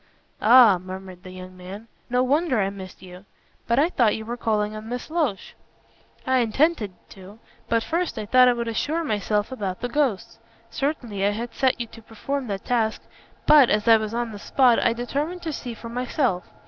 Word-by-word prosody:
"Ah!" 225 -4 +7
murmured 185 0 -9
the 185 - -11
young 185 0 -10
man. 190 +5 -10 0.2
"No 250 +1 +2
wonder 280 -1 +1
I 195 -1 0
missed 190 -1 -11
you. 180 0 -12 0.4
But 235 - +1
I 305 +5 +4
thought 235 - +2
you 220 - -6
were 235 +2 -4
calling 215 -3 -1
on 215 +1 -8
Miss 245 +5 -6
Loach." 300 - -2 0.7
"I 260 0 +2
intended 240 - +1 0.2
to, 195 +2 -13 0.3
but 230 -1 +2
first 340 -2 -2
I 215 - -4
thought 255 +4 +5
I 250 - +5
would 235 -1 -4
assure 300 +9 -1
myself 210 - -1
about 195 -7 -4
the 245 - -3
ghosts. 260 -7 -1 0.3
Certainly 245 -9 -3
I 200 - +3
had 230 +3 -4
set 260 -2 +1
you 235 - -2
to 230 0 -14
perform 255 +5 -5
that 195 -2 -5
task, 225 -3 0 0.4
but, 290 -5 +7
as 210 +1 +1
I 225 -1 +8
was 215 +1 -4
on 240 -1 -2
the 205 - -8
spot, 250 +1 +3
I - - +2
determined 290 +9 -3
to 320 -2 -3
see 245 -4 -6
for 230 - -10
myself. 245 - -1
230 Hz, 200 wpm, -24 LUFS, 205-260 Hz, 0.7 s, I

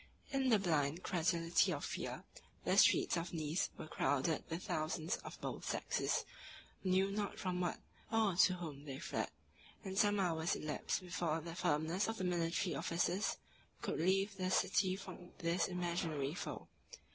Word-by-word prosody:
In 270 -2 +2
the 225 - +6
blind 160 -3 +1
credulity 170 -1 +2
of - - -2
fear, - - -4 0.4
the - - +3
streets - - +5
of 170 +1 -3
Nice 155 +2 0
were - - -6
crowded 150 0 +1
with 165 +2 -3
thousands 155 +1 -1
of - - -9
both - - -4
sexes, - - 0 0.6
who 190 - -1
knew 190 +2 +3
not 205 -1 -2
from 180 -1 -1
what 175 - 0 0.3
or 220 -5 +3
to 185 +1 +5
whom 150 -5 -7
they 135 -2 -5
fled; - - -2 0.6
and 190 +1 -1
some 205 -1 +4
hours 165 -3 +1
elapsed 155 +4 -2
before 175 -3 -1
the 165 +1 -6
firmness 165 +3 +1
of 225 0 -2
the - - -3
military 175 0 +1
officers 175 +4 0 0.5
could - - -1
relieve 195 +4 +2
the 185 -1 0
city 185 0 +3
from 185 -2 -9
this 170 +2 +1
imaginary 170 -5 -1
foe. 180 - -5
175 Hz, 160 wpm, -37 LUFS, 160-190 Hz, 0.6 s, the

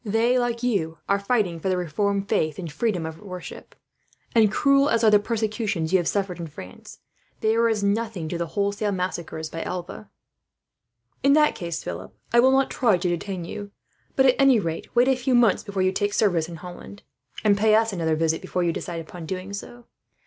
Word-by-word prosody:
They, 230 +3 +2
like 240 -1 -2
you, 175 -10 0
are 200 0 +2
fighting 200 -5 0
for 190 - -2
the 185 - +1
reformed 195 +4 -1
faith 155 -5 0
and 170 -4 -6
freedom 185 -2 -1
of 160 0 -7
worship 185 -3 -9 0.6
and, 220 -3 +5
cruel 275 +4 +3
as 230 -3 +1
are 215 - +6
the 210 - +6
persecutions 210 -6 -2
you 190 - +6
have 170 - -2
suffered 195 -3 -1
in 170 - -5
France, 95 -11 -11 0.4
they 220 0 +2
are 230 0 +3
as 215 -2 0
nothing 200 -4 -1
to 170 - -3
the 170 - -2
wholesale 200 +1 0
massacres 175 -4 -3
by 165 +1 -6
Alva." 180 +3 -6 1.1
"In 275 - +4
that 300 0 +4
case, 170 -2 -5
Philip, 90 +1 -7 0.2
I 235 - +6
will 255 +2 +6
not 270 0 +2
try 225 -7 +3
to 180 0 -1
detain 175 +1 -3
you; 205 +3 -7 0.5
but 265 - +4
at 255 - +5
any 270 -4 +6
rate, 165 -4 -4
wait 245 +1 +5
a 265 - +4
few 255 0 0
months 235 -5 +4
before 200 -3 -2
you 185 - +3
take 205 +1 -1
service 175 -6 +2
in 170 - -7
Holland, 180 +4 -10 0.4
and 210 -2 +4
pay 215 +1 +4
us 225 -1 +2
another 165 -3 0
visit 160 0 0
before 180 - -2
you 170 -1 +1
decide 170 0 -5
upon 165 0 -9
doing 185 +3 -5
so." 240 +4 -8
200 Hz, 205 wpm, -24 LUFS, 170-225 Hz, 1.1 s, are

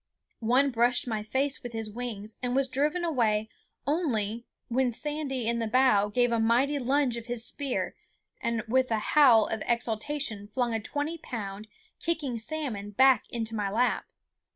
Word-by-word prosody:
One 255 +5 +3
brushed 240 +1 +2
my 220 -3 -1
face 270 +6 0
with 240 -1 -7
his 225 -1 -1
wings, 220 -2 -6
and 250 0 -1
was 270 0 +2
driven 295 +7 0
away 220 -8 +1 0.4
only 235 - -1 0.2
when 250 +1 +1
Sandy 280 -1 -3
in 235 0 +1
the 225 - -1
bow 215 -4 +4
gave 245 +3 +2
a 230 - +2
mighty 250 +6 +2
lunge 265 -1 +1
of 235 0 -8
his 240 -1 -1
spear 280 -3 -2 0.5
and 235 -1 -1
with 255 +2 +2
a 225 - +1 0.2
howl 250 -8 +7
of 220 - -3
exultation 230 -1 -1
flung 240 +2 -1
a 225 - 0
twenty 295 +8 -3
pound, 210 -4 -6 0.3
kicking 300 -8 -2
salmon 230 -6 -3
back 260 +5 +4
into 225 -1 -4
my 205 -2 -1
lap. 240 +5 +1
240 Hz, 165 wpm, -28 LUFS, 220-270 Hz, 0.5 s, howl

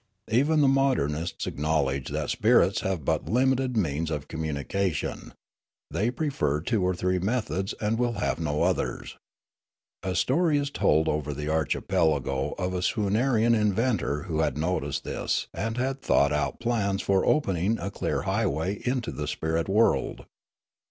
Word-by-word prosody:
Even 145 +7 +3
the 140 - +5
modernists 105 - +1
acknowledge 70 -3 -1
that - - -2
spirits - - +3
have 95 -7 -2
but - - 0
limited 130 +1 +2
means 80 -4 0
of 75 -3 -4
communication; 80 +2 -3 0.6
they 110 +4 0
prefer 120 - -1
two 105 +6 0
or 90 0 +1
three 90 +1 0
methods 95 -2 -1
and 110 +2 0
will 120 -1 +1
have 100 -5 -1
no 75 -2 0
others. - - -1 0.8
A 95 -1 -3
story 155 - +2
is 145 0 -1
told 80 - +2
over 75 -1 -1
the 75 +1 -4
archipelago 75 -3 0
of 90 0 -2
a 90 - -2
Swoonarian 110 +4 +2
inventor 105 - +1
w^ho 80 -2 0
had - - -1
noticed 75 -4 -1
this - - -2
and 115 +1 -3
had 135 +2 -1
thought 70 +1 +3
out 75 - -1
plans 105 -4 0
for 95 -1 +2
opening 100 - +1
a 95 +3 -4
clear - - -2
highway 80 +8 -1
into 125 -1 -1
the 75 -1 -4
spirit 80 +3 -1
world. 110 +4 +2
95 Hz, 150 wpm, -27 LUFS, 75-120 Hz, 0.8 s, the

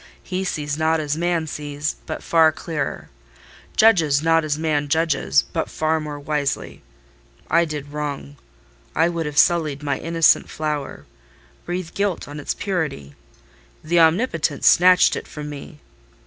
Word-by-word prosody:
He 185 0 -3
sees 150 -5 -3
not 160 +1 +2
as 150 -1 -2
man 170 0 0
sees, 150 0 -4
but 155 - -5
far 160 -1 +4
clearer: 155 -2 -5 0.7
judges 160 -10 +4
not 165 0 +3
as 150 -1 -1
man 155 -2 0
judges, 145 - +2
but - - -2
far 160 0 0
more 150 -1 -6
wisely. 145 -1 -3 0.7
I 170 +1 +4
did 150 -2 -6
wrong: 145 -1 -5 0.6
I 165 +2 +3
would 165 -2 -3
have 150 0 -6
sullied 155 -5 +3
my 140 -2 -1
innocent 165 0 +3
flower—breathed 155 - -6
guilt 200 -3 -2
on 145 +1 -8
its 145 - -3
purity: 155 - -3 0.7
the 170 +2 +2
Omnipotent 165 - +2
snatched 180 +1 +6
it - - -6
from 150 -1 -7
me. 145 +1 -10
155 Hz, 140 wpm, -21 LUFS, 145-165 Hz, 0.7 s, snatched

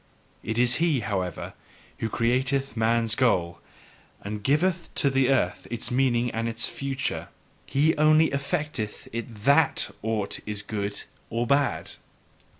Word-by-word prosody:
It 110 +1 -3
is 120 0 +3
he, 160 -6 +2
however, 95 -5 -3 0.5
who 110 - -1
createth 130 +3 0
man's 115 0 +2
goal, 95 -9 +1 0.6
and 105 +1 -5
giveth 170 - +1
to 140 - +3
the 135 -1 +3
earth 135 -2 +1
its 120 +1 -2
meaning 125 -2 +2
and 115 +1 -2
its 115 0 0
future: 135 -1 -3 0.4
he 150 +4 +2
only 155 +1 +5
EFFECTETH 140 -6 -3
it 115 -2 -6
THAT 140 +1 +4
aught 110 -2 -1
is 105 -1 -3
good 100 -1 -3 0.3
or 115 +1 -1
bad. 140 +3 +1
120 Hz, 135 wpm, -26 LUFS, 110-140 Hz, 0.6 s, only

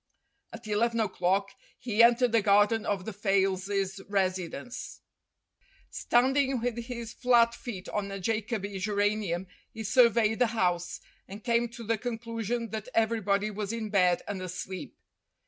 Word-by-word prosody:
At 230 0 -10
eleven 230 +2 +1
o'clock 195 -1 0 0.3
he 230 -2 +1
entered 240 +1 +5
the 230 -1 +4
garden 205 +2 +3
of 195 -3 -1
the 220 - -5
Fayles' 195 0 0
residence. 190 +3 -3 0.9
Standing 265 +1 +2
with 240 0 -1
his 235 -2 -6
flat 240 -2 +4
feet 205 -7 -7
on 205 -1 -2
a 195 0 -5
Jacoby 205 -1 -2
geranium 205 -3 0 0.3
he 225 - -7
surveyed 225 0 +4
the 245 - +4
house, 175 -3 0 0.3
and 200 +2 -10
came 235 -1 +1
to 235 0 -10
the 225 0 -1
conclusion 230 0 -3
that 220 +2 -5
everybody 215 -2 +1
was 205 0 -4
in 225 -2 -4
bed 180 -3 +3
and 200 -2 -4
asleep. 185 +1 -6
215 Hz, 140 wpm, -29 LUFS, 195-230 Hz, 0.9 s, entered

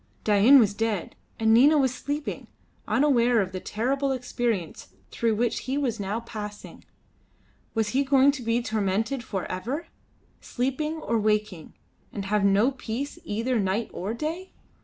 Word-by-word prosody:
Dain 215 +6 +6
was 215 -6 +4
dead, 215 -4 -2 0.2
and 220 0 +4
Nina 285 +7 +6
was 265 -3 +2
sleeping, 290 +3 -4 0.4
unaware 245 -5 +3
of 190 -2 -1
the 185 - -4
terrible 270 +8 -1
experience 240 - -2 0.2
through 230 -2 0
which 230 +1 0
he 265 +2 -1
was 245 -6 -1
now 205 +3 -2
passing. 210 -3 -8 0.9
Was 220 -2 +1
he 270 +6 +1
going 275 0 +5
to 280 -2 -7
be 230 +1 0
tormented 220 +4 -1
for 195 -5 -4
ever, 240 - -4 0.5
sleeping 270 +5 -2
or 235 -8 -1
waking, 210 -5 -1 0.4
and 200 -2 -5
have 210 0 +1
no 200 +6 +4
peace 260 +2 -5
either 230 +3 -1
night 200 +3 -1
or 205 +5 -4
day? 330 +8 -5
230 Hz, 150 wpm, -26 LUFS, 210-265 Hz, 0.9 s, Dain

